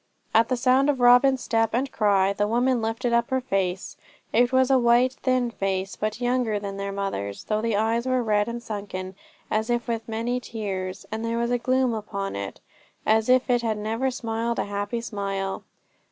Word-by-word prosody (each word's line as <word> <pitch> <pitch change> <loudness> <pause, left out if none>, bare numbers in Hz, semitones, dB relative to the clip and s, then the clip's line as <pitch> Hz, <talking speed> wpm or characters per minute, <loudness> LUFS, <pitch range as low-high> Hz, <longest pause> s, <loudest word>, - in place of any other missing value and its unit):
At 225 +1 +4
the 255 - +1
sound 260 +3 +3
of 280 -3 +1
Robin's 250 +2 +5
step 225 -1 +1
and 265 +2 -1
cry 200 -2 +2
the 205 +1 0
woman 245 +2 +1
lifted 230 +2 -1
up 235 0 +2
her 260 - +1
face. 195 -6 -2 0.4
It 240 +2 +4
was 260 0 +3
a 265 - +5
white, 240 +2 +4
thin 255 -2 0
face, 195 -2 -2
but 215 +1 -3
younger 245 -4 0
than 200 -1 -6
their 200 0 -3
mother's, 195 - -4
though 215 0 -1
the 230 -1 0
eyes 225 +3 0
were 255 -1 +1
red 210 -1 +1
and 235 0 -5
sunken, 200 -4 -5 0.4
as 220 +2 0
if 240 0 0
with 230 -1 -3
many 230 +3 -1
tears, 195 -5 -5
and 220 +1 -3
there 230 0 -1
was 235 +1 0
a 245 - +1
gloom 255 0 +1
upon 200 -2 -4
it, 100 0 -5 0.5
as 220 +2 +3
if 255 0 +4
it 245 -2 +2
had 225 -2 -1
never 225 +5 -1
smiled 230 -2 -2
a - - 0
happy 205 +3 -3
smile. 195 -4 -3
225 Hz, 195 wpm, -25 LUFS, 205-245 Hz, 0.5 s, Robin's